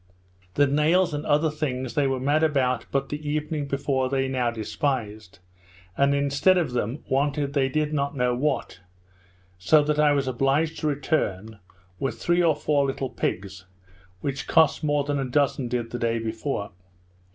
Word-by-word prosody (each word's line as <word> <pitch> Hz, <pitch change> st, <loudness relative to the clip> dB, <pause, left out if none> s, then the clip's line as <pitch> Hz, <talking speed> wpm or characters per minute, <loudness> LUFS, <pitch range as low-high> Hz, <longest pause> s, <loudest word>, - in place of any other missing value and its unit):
The 145 Hz, -, +5 dB
nails 155 Hz, +5 st, +2 dB
and 145 Hz, +1 st, -4 dB
other 150 Hz, +1 st, +2 dB
things 130 Hz, -5 st, -3 dB
they 145 Hz, -2 st, +2 dB
were 135 Hz, -1 st, -1 dB
mad 145 Hz, +4 st, +1 dB
after 130 Hz, -5 st, +1 dB
but 135 Hz, 0 st, -1 dB
the 145 Hz, +1 st, -4 dB
evening 150 Hz, -1 st, -2 dB
before, 135 Hz, -1 st, -1 dB
they 135 Hz, 0 st, 0 dB
now 130 Hz, -2 st, 0 dB
despised, 110 Hz, -3 st, -3 dB, 0.6 s
and 140 Hz, 0 st, +3 dB
instead 140 Hz, +6 st, +3 dB
of 165 Hz, -7 st, 0 dB
them 125 Hz, +3 st, -3 dB
wanted 140 Hz, +1 st, 0 dB
they 135 Hz, -2 st, +2 dB
did 150 Hz, +2 st, -1 dB
not 140 Hz, -1 st, -1 dB
know 125 Hz, -1 st, +1 dB
what; 130 Hz, -, -2 dB, 0.8 s
so 150 Hz, +12 st, +4 dB
that 150 Hz, 0 st, 0 dB
I 150 Hz, -1 st, +5 dB
was 140 Hz, -2 st, 0 dB
obliged 135 Hz, +6 st, 0 dB
to 155 Hz, -, -1 dB
return, 110 Hz, -, -2 dB, 0.4 s
with 125 Hz, -4 st, -2 dB
three 175 Hz, +9 st, +1 dB
or 165 Hz, -3 st, +3 dB
four 145 Hz, -1 st, +1 dB
little 135 Hz, -1 st, -3 dB
pigs, 95 Hz, -3 st, -4 dB, 0.6 s
which 140 Hz, -1 st, -4 dB
cost 160 Hz, -1 st, +3 dB
more 145 Hz, -1 st, +1 dB
than 145 Hz, 0 st, -2 dB
a -, -, 0 dB
dozen 135 Hz, 0 st, 0 dB
did 120 Hz, -1 st, -3 dB
the 120 Hz, -, -4 dB
day 115 Hz, 0 st, 0 dB
before. 110 Hz, -1 st, -3 dB
140 Hz, 170 wpm, -25 LUFS, 125-150 Hz, 0.8 s, The